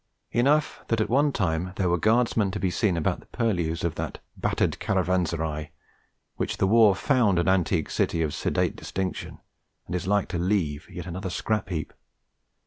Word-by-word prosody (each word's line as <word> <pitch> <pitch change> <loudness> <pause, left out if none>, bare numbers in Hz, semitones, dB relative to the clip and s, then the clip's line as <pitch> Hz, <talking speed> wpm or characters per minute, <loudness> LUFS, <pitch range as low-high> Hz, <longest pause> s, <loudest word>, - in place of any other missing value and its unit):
Enough 140 +6 +2
that 115 - +1
at 110 - 0
one 140 +4 +3
time 90 -5 -1
there 95 - 0
were 85 0 +2
Guardsmen 110 -1 +2
to 105 +2 -4
be 95 -3 0
seen 90 -1 +1
about 80 - 0
the - - -18
purlieus 85 -8 -1
of 85 -2 0
that - - -5 0.2
'battered - - 0
caravanserai' 85 -6 0 0.7
which - - -2
the - - +2
war 105 -1 +6
found 115 -4 +2
an 85 - +1
antique 90 -3 +1
city 80 - +1
of 75 -2 -2
sedate - - 0
distinction, 95 0 -4 0.5
and 90 - -7
is 90 0 -3
like 100 0 +2
to 85 - -2
leave 85 -5 -1
yet 90 - -7
another 95 +2 -4
scrap 105 +4 -1
heap. 80 -4 -4
95 Hz, 175 wpm, -26 LUFS, 85-110 Hz, 0.7 s, war